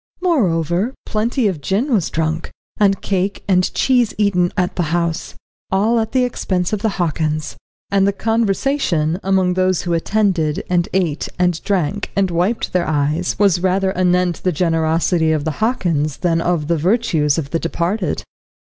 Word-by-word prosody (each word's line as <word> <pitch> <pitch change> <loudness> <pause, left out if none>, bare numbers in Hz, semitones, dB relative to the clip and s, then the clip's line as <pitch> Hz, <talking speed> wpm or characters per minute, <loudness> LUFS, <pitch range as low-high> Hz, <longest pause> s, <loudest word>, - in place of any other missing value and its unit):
Moreover, 195 - +1
plenty 225 +2 0
of 175 -7 -3
gin 220 - 0
was 195 -7 +1
drunk, 160 0 -2 0.3
and 195 -2 +2
cake 195 0 -1
and 185 -2 +2
cheese 245 -4 +2
eaten 185 -4 +2
at 180 -1 0
the - - 0 0.2
house, 170 -1 -2 0.4
all 215 +5 +2
at 220 0 -2
the 260 -1 +2
expense 185 -6 -1
of 210 - -1
the 220 - +1
Hockins. 155 -3 -1 0.4
And 195 0 +3
the - - +3
conversation 200 - 0
among 190 -1 +2
those 185 -1 +1
who 175 - -1
attended, 170 -3 0
and 175 -1 +1
ate 175 -5 -1
and 180 -2 0
drank, 200 0 -1
and 195 -2 +1
wiped 180 +7 -1
their 180 -1 +1
eyes, 155 +3 0
was 190 -4 +3
rather 190 +1 +1
anent 180 -1 +1
the 185 - +1
generosity 165 0 +1
of 155 -1 0
the 155 -2 -3
Hockins 170 - 0
than 165 -2 +1
of 165 -4 0
the 170 0 +1
virtues 165 -5 +1
of 140 -4 -4
the 165 - 0
departed. 170 +2 -2
180 Hz, 165 wpm, -18 LUFS, 165-200 Hz, 0.4 s, And